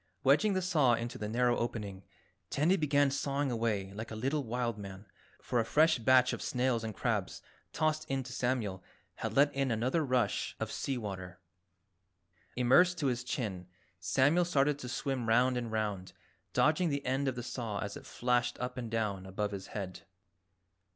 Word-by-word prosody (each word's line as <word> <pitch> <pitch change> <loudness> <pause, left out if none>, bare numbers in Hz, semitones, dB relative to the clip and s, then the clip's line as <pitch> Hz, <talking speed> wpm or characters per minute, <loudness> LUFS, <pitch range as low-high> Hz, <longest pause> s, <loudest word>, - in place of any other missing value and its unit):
Wedging 215 -2 +4
the 185 -1 0
saw 150 -9 +3
into 120 +2 -5
the 105 - -3
narrow 120 +1 +2
opening, 105 -5 -4 0.5
Tandy 160 +7 +3
began 145 -4 +2
sawing 140 0 -1
away 110 -5 -1
like 110 +2 -6
a 110 - -6
little 135 +6 -1
wild 120 -2 -2
man, 100 0 -8 0.4
for 120 - 0
a - - +3
fresh 155 +5 +3
batch 130 +2 +5
of - - -4
snails 125 -2 0
and 110 -2 -4
crabs - - -2 0.3
tossed 155 -1 0
in 135 -1 -1
to 120 0 -8
Samuel 120 -7 -1 0.3
had - - -4
let 145 +1 +5
in 135 -1 0
another 125 +8 +1
rush 125 -3 0
of - - -3
sea 135 -2 -2
water. 95 -5 -6 1.2
Immersed 175 +9 +4
to 155 - -2
his 125 -1 -2
chin, 100 -8 -3 0.3
Samuel 135 - +3
started 145 -3 +2
to 125 - -6
swim 130 -3 -2
round 125 +3 +4
and 120 -2 -3
round, 105 -4 -2 0.4
dodging 160 +3 +3
the 140 -1 -2
end 135 +2 0
of 130 - 0
the 120 - -5
saw 120 -4 -4
as 100 0 -4
it - - -10
flashed 120 0 0
up 125 0 -4
and 120 -2 -5
down 105 -4 -2
above 105 +2 -2
his 100 -1 -6
head. 95 -3 -6
125 Hz, 180 wpm, -32 LUFS, 110-140 Hz, 1.2 s, batch